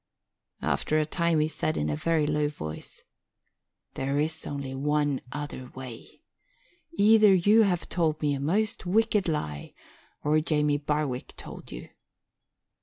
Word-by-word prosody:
After 155 Hz, -, +1 dB
a 155 Hz, -, +2 dB
time 170 Hz, 0 st, +1 dB
he 155 Hz, -, +2 dB
said 155 Hz, 0 st, -2 dB
in 75 Hz, -, 0 dB
a 75 Hz, -, 0 dB
very 160 Hz, -, +1 dB
low 150 Hz, 0 st, +1 dB
voice, 80 Hz, -, -8 dB, 0.9 s
"There 135 Hz, +1 st, -1 dB
is 160 Hz, +1 st, -2 dB
only 140 Hz, -2 st, -4 dB
one 145 Hz, 0 st, 0 dB
other 145 Hz, -3 st, -6 dB
way. 130 Hz, -3 st, -10 dB, 0.7 s
Either 215 Hz, -5 st, +6 dB
you 205 Hz, +5 st, +5 dB
have 180 Hz, -5 st, +1 dB
told 160 Hz, -3 st, 0 dB
me 145 Hz, -2 st, +1 dB
a 140 Hz, -, -2 dB
most 185 Hz, +7 st, -1 dB
wicked 215 Hz, 0 st, +2 dB
lie 75 Hz, -, -3 dB, 0.5 s
or 150 Hz, +1 st, +3 dB
Jamie 150 Hz, -2 st, +1 dB
Barwick 145 Hz, -3 st, -2 dB
told -, -, -10 dB
you." -, -, -8 dB
150 Hz, 140 wpm, -27 LUFS, 140-170 Hz, 0.9 s, Either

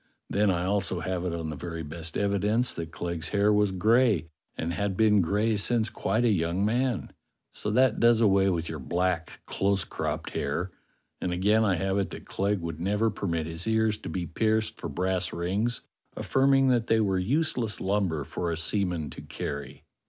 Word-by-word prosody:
Then 105 Hz, 0 st, +3 dB
I 90 Hz, -1 st, 0 dB
also 95 Hz, -3 st, 0 dB
have 90 Hz, +1 st, -2 dB
it 90 Hz, -, -1 dB
on 80 Hz, -2 st, -4 dB
the -, -, -5 dB
very 85 Hz, +2 st, -5 dB
best 80 Hz, +2 st, -5 dB
evidence 105 Hz, +4 st, +1 dB
that 80 Hz, -1 st, -6 dB
Clegg's 85 Hz, -2 st, -4 dB
hair 105 Hz, +1 st, +3 dB
was 105 Hz, -1 st, +3 dB
gray, 110 Hz, -2 st, +3 dB, 0.3 s
and 85 Hz, +1 st, -2 dB
had 100 Hz, 0 st, -2 dB
been 105 Hz, -2 st, +5 dB
gray 105 Hz, +6 st, +1 dB
since 110 Hz, +1 st, +1 dB
quite 115 Hz, +2 st, 0 dB
a 115 Hz, -, +4 dB
young 85 Hz, +1 st, +1 dB
man; 120 Hz, +1 st, 0 dB, 0.4 s
so -, -, -4 dB
that 125 Hz, +1 st, +3 dB
does 115 Hz, -1 st, +5 dB
away 100 Hz, -3 st, +4 dB
with 85 Hz, -3 st, -1 dB
your 80 Hz, -, -5 dB
black, 85 Hz, +4 st, -2 dB
close 100 Hz, 0 st, +1 dB
cropped -, -, -4 dB
hair. 85 Hz, +6 st, -2 dB, 0.5 s
And 90 Hz, -, -1 dB
again 105 Hz, +5 st, +3 dB
I 100 Hz, -4 st, +2 dB
have 95 Hz, +4 st, 0 dB
it 100 Hz, -, -1 dB
that -, -, -9 dB
Clegg 100 Hz, -1 st, -1 dB
would 80 Hz, -2 st, -5 dB
never 105 Hz, +5 st, +1 dB
permit 85 Hz, -6 st, -2 dB
his 80 Hz, +4 st, -4 dB
ears 110 Hz, -1 st, +2 dB
to -, -, -7 dB
be 90 Hz, -2 st, -3 dB
pierced 110 Hz, +5 st, 0 dB
for 85 Hz, -, -4 dB
brass 90 Hz, +4 st, 0 dB
rings, 100 Hz, +8 st, -1 dB, 0.4 s
affirming 135 Hz, 0 st, +3 dB
that 120 Hz, -2 st, +2 dB
they 115 Hz, -, +3 dB
were 95 Hz, -3 st, +1 dB
useless 120 Hz, -, 0 dB
lumber 95 Hz, -6 st, 0 dB
for 85 Hz, +4 st, -3 dB
a 80 Hz, -, -2 dB
seaman 90 Hz, -3 st, -1 dB
to -, -, -9 dB
carry." 70 Hz, 0 st, -6 dB
95 Hz, 190 wpm, -27 LUFS, 85-110 Hz, 0.5 s, been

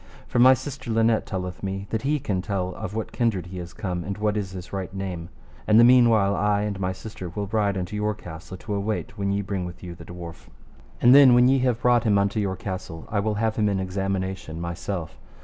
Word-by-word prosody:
For 120 Hz, -, 0 dB
my 130 Hz, +2 st, +8 dB
sister 140 Hz, -1 st, -7 dB
Linet 115 Hz, 0 st, +2 dB
telleth 90 Hz, -2 st, -4 dB
me 95 Hz, 0 st, -3 dB
that 110 Hz, -, -1 dB
he 145 Hz, +3 st, +1 dB
can 100 Hz, -9 st, -2 dB
tell 95 Hz, -2 st, -2 dB
of 110 Hz, +1 st, -6 dB
what 110 Hz, -, -3 dB
kindred 110 Hz, -7 st, 0 dB
he 90 Hz, +1 st, -7 dB
is 85 Hz, 0 st, -7 dB
come, 90 Hz, -5 st, -4 dB
and 100 Hz, +1 st, -4 dB
what 105 Hz, 0 st, 0 dB
is 100 Hz, -3 st, -2 dB
his 90 Hz, 0 st, -9 dB
right 95 Hz, -2 st, -4 dB
name. 95 Hz, -3 st, -5 dB, 0.4 s
And 110 Hz, +1 st, +6 dB
the -, -, +8 dB
meanwhile 115 Hz, -5 st, +5 dB
I 105 Hz, 0 st, +1 dB
and 105 Hz, -2 st, -3 dB
my 95 Hz, -1 st, -1 dB
sister 95 Hz, -1 st, -8 dB
will 100 Hz, +4 st, -4 dB
ride 100 Hz, -1 st, 0 dB
unto 95 Hz, +3 st, -4 dB
your 105 Hz, 0 st, -1 dB
castle 90 Hz, -1 st, -9 dB
to 105 Hz, +4 st, -6 dB
await 100 Hz, +1 st, -2 dB
when 100 Hz, 0 st, 0 dB
ye 100 Hz, +1 st, 0 dB
bring 95 Hz, -1 st, -3 dB
with 90 Hz, +1 st, -8 dB
you 90 Hz, -1 st, -6 dB
the 85 Hz, -, -11 dB
dwarf. 85 Hz, -2 st, -9 dB, 0.6 s
And 120 Hz, +1 st, +8 dB
then 135 Hz, -3 st, +8 dB
when 125 Hz, 0 st, +6 dB
ye 135 Hz, +1 st, +4 dB
have 125 Hz, -2 st, 0 dB
brought 120 Hz, -2 st, +4 dB
him 105 Hz, -3 st, +3 dB
unto 100 Hz, +2 st, +1 dB
your 100 Hz, -2 st, -1 dB
castle, 95 Hz, -4 st, -6 dB
I 105 Hz, -, +1 dB
will 105 Hz, +1 st, 0 dB
have 110 Hz, +1 st, 0 dB
him 105 Hz, -2 st, +2 dB
in 100 Hz, -1 st, 0 dB
examination 95 Hz, -3 st, -3 dB
myself. 85 Hz, 0 st, -5 dB
100 Hz, 235 wpm, -25 LUFS, 95-110 Hz, 0.6 s, my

